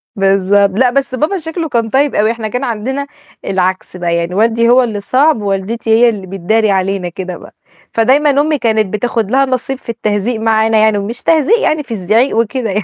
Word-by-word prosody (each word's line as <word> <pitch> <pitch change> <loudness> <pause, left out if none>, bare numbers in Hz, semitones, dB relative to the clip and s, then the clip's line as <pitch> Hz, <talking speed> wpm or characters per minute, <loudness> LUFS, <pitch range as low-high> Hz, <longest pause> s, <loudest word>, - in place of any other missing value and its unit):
بالضبط، 195 0 +2
لأ، 260 -1 +4
بس 265 0 -1
بابا 305 +9 -1
شكله 325 -1 -5
كان 230 -3 -1
طيب 280 +4 +1
أوي، 215 +2 +2
إحنا 230 -2 -5
كان 250 +5 -4
عندنا 265 +4 -3 0.4
العكس 185 -1 -2
بقى، 175 -1 -1
يعني 170 +1 -2
والدي 230 +2 +2
هو 255 +1 +5
اللي 220 -4 -3
صعب، 260 +5 +1
ووالدتي 205 +3 -3
هي 230 +2 +5
اللي 200 -4 -5
بتداري 200 +4 0
علينا 190 -1 -1
كده 180 +1 -6
بقى، - - -15 0.4
فدايمًا 265 +6 +3
أمي 305 0 0
كانت 220 -4 0
بتاخد 225 -1 -2
لها 270 +1 +3
النصيب 260 0 -2
في 250 - -16
التهزيق 220 0 -2
معانا 220 0 +2
يعني، 215 -1 +3
ومش 215 +4 -5
تهزيق 325 - +3
يعني 310 -9 0
في 260 - -7
الزعيق 220 +5 +1
وكده 230 +1 -1
يع 205 +2 -1
225 Hz, 195 wpm, -14 LUFS, 200-260 Hz, 0.4 s, هو